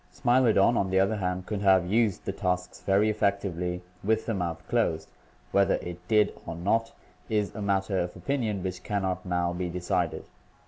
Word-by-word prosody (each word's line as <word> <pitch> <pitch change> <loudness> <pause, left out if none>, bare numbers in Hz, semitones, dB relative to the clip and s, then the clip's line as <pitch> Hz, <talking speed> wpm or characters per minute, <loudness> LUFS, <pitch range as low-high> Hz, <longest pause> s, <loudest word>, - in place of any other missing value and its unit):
Smilo 120 -1 +3
don, 110 +3 +4
on 95 - +1
the 95 0 +3
other 100 +3 +2
hand, 90 -1 -2
could 105 -1 -3
have 95 -3 +5
used 110 +1 +1
the - - -1
tusks 90 0 -2
very 100 +2 +3
effectively 95 -4 -1 0.2
with 110 +2 +1
the 115 - -1
mouth 85 -3 -3
closed; 85 -10 0 0.4
whether 100 -1 +3
it 90 +1 -7
did 105 -2 +3
or 85 - -4
not 110 +7 0 0.4
is 105 -2 0
a 105 - -6
matter 95 -1 0
of 90 0 -3
opinion 115 -9 -2
which 90 -1 -4
can 100 -2 -2
not 95 -1 -2
now 90 -1 0
be 90 0 -3
decided. 90 +1 -1
95 Hz, 185 wpm, -28 LUFS, 90-105 Hz, 0.4 s, have